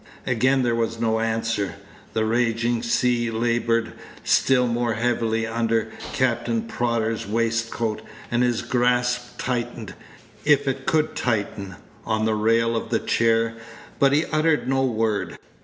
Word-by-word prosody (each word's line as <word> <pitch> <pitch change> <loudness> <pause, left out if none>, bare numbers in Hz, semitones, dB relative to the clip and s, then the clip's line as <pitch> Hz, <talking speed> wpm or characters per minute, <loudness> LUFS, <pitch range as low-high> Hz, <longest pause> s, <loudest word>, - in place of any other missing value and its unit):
Again 130 +2 +2
there 120 -1 +1
was 115 0 -1
no 110 -1 +1
answer. 110 -4 -1 0.4
The 110 0 +1
raging 115 0 +1
sea 120 0 +1
labored 115 0 0 0.3
still 125 -2 +3
more 120 -1 0
heavily 115 -1 0
under 115 -1 0 0.2
Captain 120 -4 0
Prodder's 115 -2 -1
waistcoat, 115 0 -1 0.3
and 120 0 +2
his 120 -2 +1
grasp 125 0 0
tightened, 120 -4 -3 0.5
if 145 -1 +3
it 135 0 -2
could 155 -1 +1
tighten, 100 -5 -2 0.3
on 110 0 0
the 110 - +2
rail 115 +2 +2
of 115 - -3
the 115 - +2
chair; 115 0 +1 0.4
but 135 -1 +5
he 150 +3 +3
uttered 155 -3 +1
no 135 0 +2
word. 110 -4 -1
115 Hz, 135 wpm, -23 LUFS, 115-125 Hz, 0.5 s, but